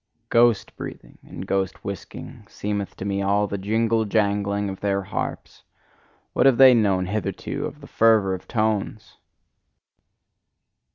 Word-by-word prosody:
Ghost 115 -2 +3
breathing - - -9
and 95 - -9
ghost 95 0 -2
whisking, 100 -3 -8
seemeth 100 -1 -4
to 95 - -7
me 100 0 -1
all 100 +1 +2
the 100 -1 -4
jingle 110 +3 +1
jangling 100 -1 0
of 95 -1 -6
their 100 -1 -1
harps; 95 - -5 0.7
what - - +4
have 130 -3 +4
they 130 -1 +8
known 100 -5 +2
hitherto 105 +1 -3
of - - -12
the - - -11
fervour 110 -4 +3
of 90 - -7
tones! 110 -2 -2
100 Hz, 135 wpm, -23 LUFS, 100-110 Hz, 0.7 s, they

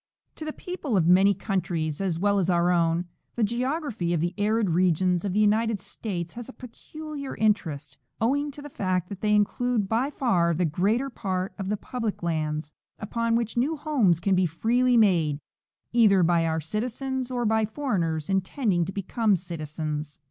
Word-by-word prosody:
To 310 - -6
the 310 - -4
i^eople 315 - -3
of 170 - +3
many 190 +3 +5
countries, 175 -5 -2
as 185 -4 0
well 200 +3 +2
as 185 -1 0
our 175 0 +3
own, 170 0 +2 0.3
the 235 - 0
geog 250 +9 0
raphy 175 - -2
of - - 0
the 175 +3 -1
arid 210 -1 +1
regions 180 0 +2
of 195 -3 -2
the 210 - +1
United 215 +1 +2
States 185 -3 -5
has 240 +1 -8
a - - -9
peculiar 285 +3 -8
interest, 160 -10 -1 0.2
owing 285 +6 +1
to 285 +1 -10
the 290 - -8
fact 185 -4 -1
that 195 -2 -7
they 210 -1 +3
include 215 +1 +1
by 230 +7 +1
far 180 - +1
the 180 +2 +1
greater 210 - 0
part 190 -4 -3
of 195 -1 -3
the 210 - 0
public 230 -4 -4
lands, 155 -2 -2 0.2
upon 230 +2 -1
which 230 -1 -1
new 280 +7 +1
homes 260 - +2
can 195 +3 +1
be 185 -1 +3
freely 240 +9 +2
made 170 -9 +3 0.6
either 210 -6 +5
by 170 -1 +3
our 160 0 0
citizens 250 - -3
or 245 -2 -1
by 220 0 +2
foreigners 190 - -1
intending 190 -1 0
to 190 - -5
become 205 +2 +1
citizens. 155 -3 -5
200 Hz, 180 wpm, -26 LUFS, 170-235 Hz, 0.6 s, many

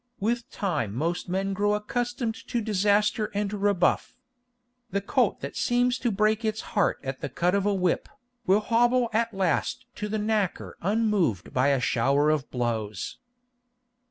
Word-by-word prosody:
With 235 +3 -1
time 150 - -2
most 170 +7 -2
men 195 +2 -1
grow 205 +2 +1
accustomed 240 +2 -2
to 240 - -1
disaster 210 0 +2
and 205 0 -1
rebuff. 200 +2 +1 0.7
The 200 - 0
colt 200 - +1
that - - -6
seems 245 +1 +1
to 240 - 0
break 215 +2 +1
its 220 0 -1
heart 205 - +2
at 135 -1 -5
the - - -3
cut 175 +1 0
of 200 0 +1
a 205 - +2
whip, 180 -2 0 0.4
will 195 +3 +4
hobble 240 +2 +2
at 230 +1 +1
last 195 +6 -1
to 210 - -3
the 215 - -1
knacker 210 -3 -1
unmoved 200 - +1
by 130 +2 +3
a 140 -2 +3
shower 140 +5 +2
of 150 -3 -1
blows. 110 -5 -3
205 Hz, 155 wpm, -26 LUFS, 170-220 Hz, 0.7 s, will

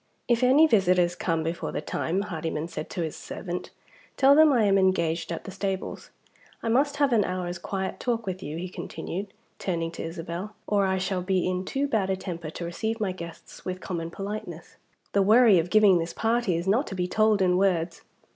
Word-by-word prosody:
"If 235 0 +2
any 265 +5 +6
visitors 180 - +3
come 165 -3 -1
before 165 +2 -3
the - - -2
time," 180 +4 -2
Hardyman 160 -4 -3
said 155 -2 -6
to 175 - -3
his 160 - -4
servant, 180 -2 -6 0.5
"tell 275 +1 +6
them 310 0 +7
I 240 -5 +3
am 195 -1 +4
engaged 170 -3 +1
at 165 - -4
the - - -8
stables. 195 0 -4 0.5
I 230 - -1
must 280 +5 +2
have 285 -3 +2
an 215 -3 +4
hour's 180 -1 -3
quiet 190 +1 -4
talk 235 -2 -1
with 185 -1 -4
you," 150 -1 -5
he 180 +2 -4
continued, 190 +2 -6 0.3
turning 165 -3 -2
to - - -6
Isabel, 170 +4 -6
"or 200 -2 +2
I 190 0 +1
shall 185 0 -1
be 185 0 0
in 185 0 -1
too 275 +6 -1
bad 210 -7 0
a 190 - +2
temper 175 -4 -6
to 170 +2 -6
receive 220 +7 -3
my 205 -3 0
guests 170 -2 -10
with 185 0 -4
common 170 -3 -4
politeness. 195 -2 -7 0.4
The 200 - +4
worry 215 -1 +6
of 165 +2 -2
giving 205 -3 +6
this 165 +1 -3
party 230 -4 +1
is 170 +2 -4
not 230 +9 +2
to 190 - -5
be 180 -1 -1
told 215 +2 +3
in 180 -1 +3
words. 180 -3 +1
190 Hz, 205 wpm, -26 LUFS, 175-215 Hz, 0.5 s, them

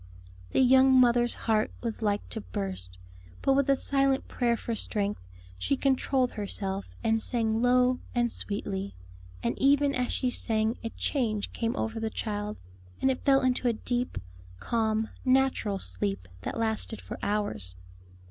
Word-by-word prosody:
'" 90 0 -21
The - - +2
young 265 +1 +6
mother's 240 -1 +4
heart 220 -1 +2
was 230 -1 -3
like 205 - 0
to 90 - -5
burst, 90 0 -5 0.5
but 270 - +4
with 275 0 +2
a 275 - +6
silent 275 0 +1
prayer 235 -2 +1
for 230 - -4
strength, 210 -2 -2 0.4
she 90 +9 0
controlled 265 -1 +1
herself 200 -1 -3
and 225 -1 +2
sang 225 -2 0
low 250 +1 +4 0.2
and 240 -1 +2
sweetly, 200 -1 -4 0.5
and - - 0
even 280 +1 +4
as 250 -1 0
she 255 -2 0
sang 220 -1 0
a 230 - -2
change 225 -5 -1
came 230 +1 -1
over 225 -3 -2
the 225 0 -1
child, 210 -1 -3 0.4
and 265 - +3
it 255 - -4
fell 270 -1 +5
into 255 -1 +1
a 235 - +3
deep, 245 - -2 0.4
calm, 220 - 0 0.2
natural 255 -6 +2
sleep 90 - -1
that - - -4
lasted 220 0 -1
for - - -8
hours. 110 - -1
225 Hz, 155 wpm, -28 LUFS, 205-255 Hz, 0.5 s, young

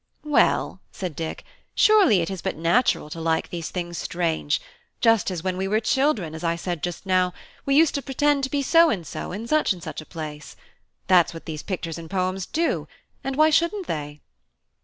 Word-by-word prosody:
"Well," 300 - +2
said 180 -5 -5
Dick, 160 +1 -5 0.3
"surely 395 - +5
it 170 - -3
is 190 -3 -5
but - - -2
natural 170 +3 +2
to 165 - -6
like 160 0 0
these 170 -2 -4
things 175 -2 -4
strange; 165 -3 -1 0.4
just 225 -3 +3
as 175 -3 -4
when 185 -1 -1
we 190 +1 -1
were 215 +2 +2
children, 225 - +1
as 160 +2 -7
I 170 0 +1
said 170 -1 -4
just 175 +2 -4
now, 185 -1 +2 0.3
we 275 - +3
used 315 0 +5
to 280 - -1
pretend 280 +1 +1
to - - -6
be 285 -1 -1
so 330 +4 +5
and 180 - -2
so - - -6
in 205 +5 -5
such 305 -3 +2
and 175 -3 -12
such - - -6
a - - -12
place. 155 -3 -7 0.5
That's 175 -2 +4
what 165 - -9
these 155 -1 -5
pictures 170 -4 -4
and 165 -1 -9
poems 185 -1 -1
do; 330 +1 -1 0.4
and 270 0 -2
why 310 +2 +5
shouldn't 340 +5 +1
they?" 150 - -5
185 Hz, 200 wpm, -24 LUFS, 165-270 Hz, 0.5 s, surely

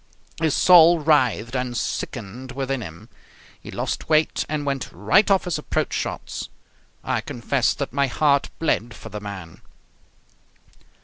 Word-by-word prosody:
His 160 -3 +2
soul 175 -1 +7
writhed 130 -6 +2
and 125 -1 -2
sickened 125 +4 -5
within 135 -1 -2
him. 85 -5 -9 0.5
He - - -11
lost - - -4
weight 155 0 +2
and 150 -1 -2
went 135 -2 -2
right 205 +2 +3
off 195 -2 +4
his 180 - -2
approach - - -2
shots. - - -4 0.5
I - - -1
confess 125 +2 0
that 140 -3 -4
my 140 0 +2
heart 140 +1 +2
bled 120 -8 -1
for - - -10
the 105 - -7
man. 95 -5 -8
135 Hz, 140 wpm, -23 LUFS, 120-155 Hz, 0.5 s, soul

